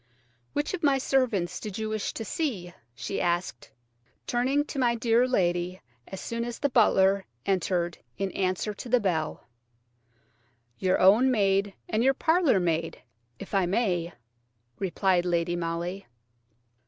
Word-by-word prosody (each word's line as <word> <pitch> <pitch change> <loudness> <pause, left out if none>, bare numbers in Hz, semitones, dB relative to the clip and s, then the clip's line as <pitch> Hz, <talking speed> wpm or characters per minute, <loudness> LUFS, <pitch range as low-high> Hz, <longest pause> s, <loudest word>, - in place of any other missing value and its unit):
"Which 295 +4 -1
of 370 - -3
my 280 -3 +3
servants 240 -10 0
did 210 -3 -6
you 220 0 -3
wish 215 -1 -2
to 225 - -5
see?" 200 - -3 0.2
she 195 - -4
asked, 175 -8 -2 0.6
turning 265 +4 +1
to 285 - -5
my 240 -2 +2
dear 235 +1 +3
lady 180 -5 0 0.3
as 190 - -7
soon 230 0 -3
as 240 -1 -5
the 285 - 0
butler 200 -5 +3 0.2
entered 180 -3 0 0.2
in 195 -1 -2
answer 185 +3 -1
to 240 - -9
the 250 +1 +4
bell. 165 -7 -2 1.3
"Your 185 0 +2
own 215 +8 +6
maid 200 -4 +1
and 220 +2 0
your 270 +1 +4
parlour 320 - +3
maid, 165 -4 -2 0.3
if - - -10
I 195 -3 +2
may," 180 -4 0 0.7
replied 185 -1 +1
Lady 175 -1 0
Molly. 175 +3 -4
195 Hz, 140 wpm, -27 LUFS, 175-240 Hz, 1.3 s, own